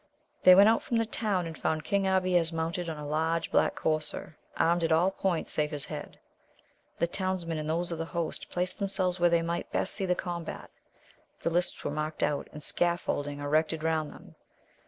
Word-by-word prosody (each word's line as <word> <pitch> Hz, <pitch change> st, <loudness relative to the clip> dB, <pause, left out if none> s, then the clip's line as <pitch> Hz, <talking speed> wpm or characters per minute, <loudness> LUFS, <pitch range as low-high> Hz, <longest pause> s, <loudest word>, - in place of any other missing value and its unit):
They 185 Hz, -, +9 dB
went 200 Hz, +2 st, +8 dB
out 225 Hz, +1 st, +4 dB
from 235 Hz, -, -1 dB
the 230 Hz, -, +2 dB
town, 210 Hz, -5 st, -1 dB
and 165 Hz, -1 st, -6 dB
found 155 Hz, 0 st, -1 dB
King 200 Hz, +1 st, +1 dB
Abies 185 Hz, -3 st, +2 dB
mounted 165 Hz, +1 st, -2 dB
on 160 Hz, -, -4 dB
a 150 Hz, -, -6 dB
large 160 Hz, +2 st, 0 dB
black -, -, +3 dB
courser, 155 Hz, -1 st, -1 dB, 0.2 s
armed 170 Hz, +1 st, +2 dB
at 165 Hz, -, +1 dB
all 170 Hz, +4 st, +4 dB
points 190 Hz, -3 st, -1 dB
save 150 Hz, 0 st, +1 dB
his 145 Hz, -2 st, -1 dB
head. -, -, -7 dB, 0.8 s
The -, -, +2 dB
townsmen 175 Hz, -2 st, -2 dB
and 155 Hz, 0 st, -4 dB
those 170 Hz, +2 st, -1 dB
of 165 Hz, -, -4 dB
the 165 Hz, -, -2 dB
host 170 Hz, -1 st, -4 dB
placed 180 Hz, +3 st, -2 dB
themselves 190 Hz, -2 st, +1 dB
where 175 Hz, 0 st, +5 dB
they 170 Hz, -1 st, +2 dB
might 170 Hz, +1 st, -3 dB
best -, -, 0 dB
see 195 Hz, -2 st, -1 dB
the 180 Hz, -, +2 dB
combat. 175 Hz, -2 st, -5 dB, 0.7 s
The 165 Hz, -, 0 dB
lists 175 Hz, +1 st, -1 dB
were -, -, -2 dB
marked 155 Hz, +1 st, -3 dB
out, 145 Hz, -1 st, 0 dB
and 150 Hz, -, -8 dB
scaffolding 145 Hz, -5 st, 0 dB
erected 155 Hz, +2 st, +1 dB
round 160 Hz, -2 st, 0 dB
them. -, -, -14 dB
170 Hz, 200 wpm, -29 LUFS, 160-180 Hz, 0.8 s, They